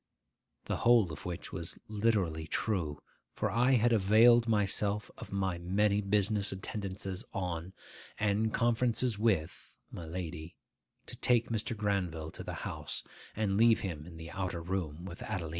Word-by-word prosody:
The - - -1
whole 115 -7 +4
of 80 - -7
which 90 0 -6
was 85 -2 -5
literally 100 -8 0
true; 80 -7 -1 0.3
for 105 - -1
I 125 +5 +3
had 120 -1 +4
availed 115 +3 +6
myself 105 -1 +1
of - - -10
my 95 -3 -1
many 100 +4 +2
business 100 0 +1
attendances 95 -1 -5
on, 90 -1 -3 0.5
and 110 +1 +1
conferences 120 -1 +1
with, 95 -8 0 0.2
my 85 - -7
lady, 85 -1 -6 0.5
to - - -6
take 120 -2 +2
Mr. 115 0 -1
Granville 90 -6 -1
to - - -8
the - - -5
house, - - -4 0.3
and 100 -2 0
leave 115 +1 +5
him 80 -5 -5
in 85 -2 -10
the 80 0 -8
outer 90 -3 -3
room 85 -2 -3
with 90 -1 -8
Adelina. 95 -7 -3
100 Hz, 150 wpm, -32 LUFS, 85-110 Hz, 0.5 s, availed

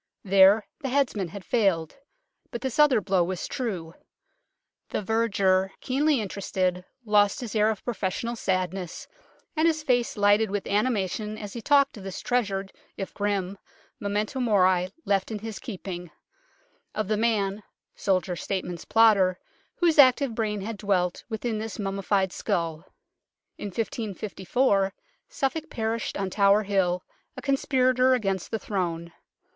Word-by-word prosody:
There 195 +2 +6
the 275 -4 -3
headsman 250 -8 +1
had 190 +3 -9
failed, 195 -9 +1 0.5
but 235 - -6
this 265 0 -3
other 290 -7 +5
blow 190 -2 +2
was 185 +1 -3
true. 185 -10 -4 1.0
The - - -2
verger, 195 -4 +2
keenly 285 +2 +1
interested, 185 -3 -2 0.2
lost 205 -2 +3
his 235 -3 -6
air 215 0 +4
of 215 -3 -4
professional 235 +1 -2
sadness, 185 -3 -2 0.5
and 315 +1 +3
his 315 -2 +1
face 245 -5 +1
lighted 205 +1 +4
with 205 0 -2
animation 210 -1 -1
as 205 -2 -7
he 235 - -6
talked 280 -1 +3
of 200 - -9
this 195 -1 -6
treasured 200 -6 -1 0.2
if 195 - -5
grim 200 -2 -2 0.4
memento 210 +4 -2
mori 185 -6 +3 0.2
left 195 -2 +1
in 220 - -3
his 220 0 -6
keep 205 -5 -8
ing; 175 -2 -5 0.9
of 215 -2 -1
the 215 - +1
man 210 -2 0 0.3
soldier, 185 -2 0
statesman, 180 -1 -3
plotter 205 -5 +5 0.4
whose 335 -3 +2
active 260 -1 +6
brain 215 -2 -2
had 215 +2 -5
dwelt 185 -3 0
within 220 0 -2
this 220 0 -5
mummi 195 -1 -3
fied 190 -1 +1
skull. 165 -2 -2 0.7
In - - -4
1554 205 0 -1 0.3
Suffolk 320 - -2
perished 225 0 -2
on 195 -1 -2
Tower 200 +1 +4
Hill, 185 -3 +1 0.3
a - - -5
conspirator 255 -2 +3
against 195 -6 -2
the 225 - -1
Throne. 170 -5 -3
205 Hz, 140 wpm, -26 LUFS, 190-230 Hz, 1.0 s, There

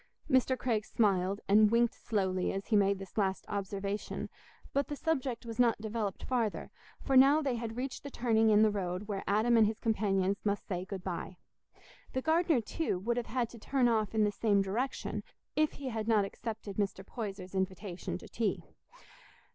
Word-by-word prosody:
Mr. 260 -2 +3
Craig 225 -5 0
smiled 195 -3 +1
and 210 +1 +6
winked 235 +2 +3
slowly 190 -4 -1
as 195 0 -4
he 220 - +3
made 200 -1 +4
this 195 +2 -6
last 190 -2 0
observation, 200 0 -3 0.4
but 280 0 +1
the 295 - -4
subject 265 -7 -1
was 230 0 -7
not 235 -3 +4
developed 215 -2 -3
farther, 235 -5 -1 0.3
for 270 - -1
now 275 +4 +7
they 280 -4 0
had 230 -1 -4
reached 260 +1 -4
the 280 - -7
turning 225 -4 +2
in 215 0 +6
the 215 - +4
road 185 0 -3
where 200 -2 -3
Adam 220 +4 +3
and 220 -2 +6
his 220 +1 -3
companions 200 -3 +1
must 205 -1 -1
say 180 -1 -3
"good 190 -1 -6
bye." 185 0 -5 0.8
The 260 - 0
gardener, 320 -4 +3
too, 305 - -2
would 235 +6 -1
have 240 - -2
had 240 0 0
to 235 - -11
turn 260 +2 +2
off 220 -2 +1
in 215 - +4
the 210 - +2
same 205 -1 +2
direction 235 +8 -2 0.3
if 310 0 +2
he 275 -2 -5
had 220 -2 -3
not 215 -3 +4
accepted 215 -1 -6
Mr. 195 -2 -1
Poyser's 195 -5 -6
invitation 190 -1 -3
to - - -12
tea. - - -1
215 Hz, 185 wpm, -32 LUFS, 195-240 Hz, 0.8 s, now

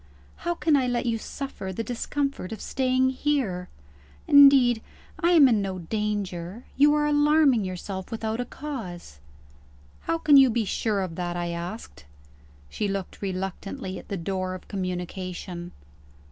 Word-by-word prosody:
How 345 +1 -2
can 305 -1 +2
I 260 -3 +2
let 245 0 -1
you 230 -2 0
suffer 215 -8 -6
the 205 +5 -3
discomfort 260 -2 -3
of 220 - -6
staying 260 0 +1
here? 255 -11 -1 0.6
Indeed, 275 -5 +7 0.4
I 345 +1 +3
am 305 -5 +8
in 225 -5 +3
no 190 -1 -3
danger; 200 +1 -3
you 295 +2 +5
are 300 0 +2
alarming 295 -6 +4
yourself 185 +1 -5
without 225 -1 -3
a - - -3
cause." 215 - -7 0.9
"How 330 - +1
can 305 -3 +6
you 270 -1 +7
be 230 -1 0
sure 205 0 0
of 185 -3 -4
that?" 175 -1 -3
I 175 0 -2
asked. 170 - -7 0.6
She 205 - -3
looked 195 -2 -4
reluctantly 190 0 -4
at - - -14
the 200 - -3
door 185 +1 -3
of 185 - -11
communication. 180 -1 -5
215 Hz, 150 wpm, -26 LUFS, 185-270 Hz, 0.9 s, am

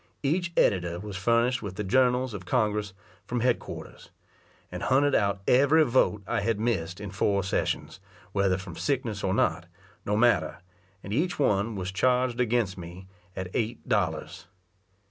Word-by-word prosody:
Each 170 +5 0
editor 85 -2 +2
was 105 0 -7
furnished 115 +6 +2
with 100 -3 -6
the 105 - -3
journals 125 +3 +2
of 100 -3 -6
Congress 105 -1 0 0.3
from 120 -1 -2
head 125 0 +2
quarters; - - -10 0.6
and 90 0 -6
hunted 140 +2 +3
out 100 -1 +1
every 145 +5 +5
vote 120 -6 +2
I 100 - -1
had 110 0 0
missed 95 -7 -1
in 100 -2 -6
four 100 0 +1
sessions, 95 - -2 0.3
whether 95 -1 +1
from 95 -3 -8
sickness 120 -7 -2
or 95 0 +1
not, - - +1 0.4
no 105 +1 0
matter, 120 +1 +2 0.5
and 100 - -5
each 175 +8 0
one 105 -5 +1
was 95 -1 -4
charged 125 +4 +1
against 115 -6 0
me 90 +2 -9 0.3
at 95 -1 -5
eight 115 +1 -2
dollars. 90 -10 -1
105 Hz, 160 wpm, -27 LUFS, 95-125 Hz, 0.6 s, every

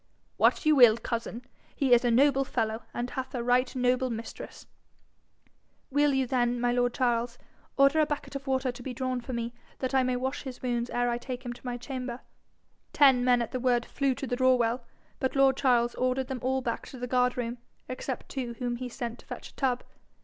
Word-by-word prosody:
'What - - +3
you 310 0 +5
will, 240 -4 +7
cousin. 235 0 -4 0.3
He 265 -3 +3
is 240 0 +5
a 245 - +2
noble 270 +3 +4
fellow, 225 -3 -2
and 245 +1 -4
hath 260 0 -5
a 240 - -2
right 250 +2 +2
noble 255 0 +1
mistress.' 230 -1 -7 1.3
'Will 290 +1 +3
you 265 -1 +2
then, 245 -1 +1
my 245 0 +1
lord 245 0 +1
Charles, 240 -1 0 0.4
order 275 +3 +5
a 305 - +4
bucket 295 -1 -4
of 275 0 -6
water 260 -1 +1
to 245 +1 -11
be 250 0 -6
drawn 255 -1 -2
for 255 - -7
me, 235 0 -3 0.2
that 260 0 -3
I 265 - +4
may 255 0 0
wash 260 +2 -2
his 260 -3 -8
wounds 240 -1 -1
ere 245 0 0
I 240 0 -1
take 255 +1 -6
him 240 - -3
to 245 - -17
my 245 0 -2
chamber?' 250 -1 -5 0.7
Ten 265 -4 +5
men 245 -1 +4
at 230 - -7
the 255 - -2
word 245 -1 +2
flew 275 -2 0
to 270 - -5
the 245 - -2
draw 255 0 +4
well, 240 0 0 0.4
but 260 0 -1
lord 270 -1 +5
Charles 240 -3 +2
ordered 255 +1 -1
them 265 -2 -3
all 265 +1 0
back 235 -2 -3
to 260 - -10
the 250 - -4
guard 250 0 +1
room, 240 0 -3 0.3
except 255 0 -5
two 245 -3 -4
whom 240 0 -3
he 250 0 -5
sent 240 -1 -5
to - - -18
fetch - - -7
a - - -20
tub. 255 -3 0
250 Hz, 220 wpm, -28 LUFS, 240-265 Hz, 1.3 s, will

